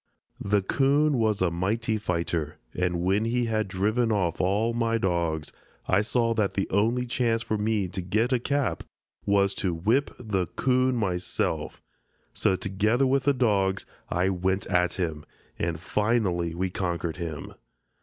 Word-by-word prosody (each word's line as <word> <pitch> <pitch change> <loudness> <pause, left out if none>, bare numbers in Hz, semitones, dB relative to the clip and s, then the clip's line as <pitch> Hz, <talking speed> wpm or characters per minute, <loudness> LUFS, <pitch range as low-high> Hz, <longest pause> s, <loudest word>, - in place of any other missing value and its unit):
The 100 -1 +2
'coon 140 +4 +2
was 110 -4 +2
a 90 - +2
mighty 110 +6 -1
fighter, 85 -5 -2 0.2
and 90 -1 -1
when 95 +4 +2
he 120 +1 +1
had 110 -2 0
driven 110 +5 +1
off 90 -6 0
all 105 +5 +1
my 115 -1 +1
dogs 85 -6 -1 0.4
I 95 +2 +3
saw 115 +1 +1
that 105 -3 0
the 95 - 0
only 115 +5 +2
chance 115 -2 0
for 110 - -1
me 105 -2 0
to 95 - -4
get 110 +8 +1
a 125 - +3
cap 140 +2 -1 0.5
was 100 -1 +3
to 90 -4 -1
whip 115 +12 +1
the 100 -7 -1
'coon 130 - +1
myself, 90 -6 -2 0.5
so 95 - +2
together 105 +7 +1
with 135 0 +1
the 145 - +4
dogs 100 -6 +1 0.2
I 90 +2 +1
went 95 +1 0
at 90 -1 +1
him, 80 -5 -2 0.4
and 85 -1 -1
finally 95 -4 0
we 90 +1 -1
conquered 85 -3 -2
him. 80 -4 -5
100 Hz, 155 wpm, -26 LUFS, 90-115 Hz, 0.5 s, the